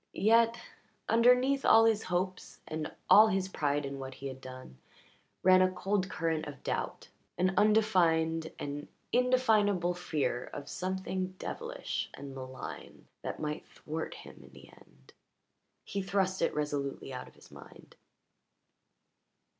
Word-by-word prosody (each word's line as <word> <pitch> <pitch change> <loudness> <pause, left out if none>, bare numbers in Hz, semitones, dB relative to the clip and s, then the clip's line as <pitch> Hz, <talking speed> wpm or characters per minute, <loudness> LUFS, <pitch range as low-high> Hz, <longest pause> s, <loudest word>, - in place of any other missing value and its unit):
Yet, 230 +2 +4 0.5
underneath 250 +4 +4
all 225 - +7
his 220 -1 +3
hopes 185 +1 -3
and 155 -1 -4 0.2
all 215 +1 +9
his 190 -2 0
pride 145 -5 -1
in 140 0 -5
what 130 -1 -7
he 140 - -10
had 130 0 -9
done 130 - -10 0.6
ran 185 0 +7
a 185 - +5
cold 190 +1 -1
current 160 -3 -1
of 145 -3 -9
doubt, - - -3 0.3
an 185 +2 +2
undefined 175 -6 +3
and 145 +1 -5 0.2
indefinable 220 -8 +3
fear 155 -8 -2
of 145 -1 -8
something 185 +2 -3
devilish - - -4
and 140 0 -8
malign 130 -1 -9
that - - -5
might 150 +1 -4
thwart 160 +1 -6
him - - -12
in 70 - -15
the 70 +1 -14
end. 65 0 -21 0.7
He 200 - -3
thrust 190 -1 0
it - - +1
resolutely 145 -2 -3
out 125 - -6
of - - -17
his - - -18
mind. - - -14
180 Hz, 140 wpm, -31 LUFS, 145-205 Hz, 0.7 s, all